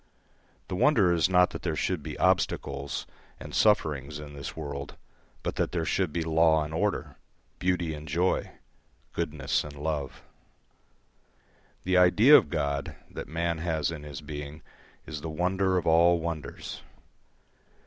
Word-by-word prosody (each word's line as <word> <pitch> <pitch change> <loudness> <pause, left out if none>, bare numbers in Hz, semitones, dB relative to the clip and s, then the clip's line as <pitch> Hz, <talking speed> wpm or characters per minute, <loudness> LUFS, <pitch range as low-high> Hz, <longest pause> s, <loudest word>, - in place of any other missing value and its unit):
The - - -3
wonder 100 -5 +4
is 85 -1 +2
not 90 -1 +4
that - - -6
there 80 -3 -2
should 90 0 -1
be - - -7
obstacles 70 0 0 0.3
and - - -9
sufferings 75 -8 +2
in 75 -1 -9
this 70 -1 -7
world, 70 -2 -6 0.5
but - - -3
that - - 0
there 85 -2 -1
should 90 +1 0
be 85 +1 -1
law 80 -1 +3
and 75 +1 -7
order, 100 +5 -1 0.4
beauty 90 -3 0
and 75 0 -8
joy, 85 +5 +1 0.6
goodness 75 -5 -1
and 75 -1 -9
love. 75 -2 -4 1.6
The 90 0 +2
idea 105 +10 +7
of 80 - +5
God 70 -1 -2 0.2
that - - -6
man 85 0 -1
has 80 -2 -1
in 80 -3 -6
his 75 -2 -8
being 75 +1 -7 0.4
is 75 -2 -6
the 80 - -5
wonder 95 +3 +1
of 85 - -1
all 85 +2 +5
wonders. 80 -2 -5
80 Hz, 150 wpm, -28 LUFS, 75-90 Hz, 1.6 s, idea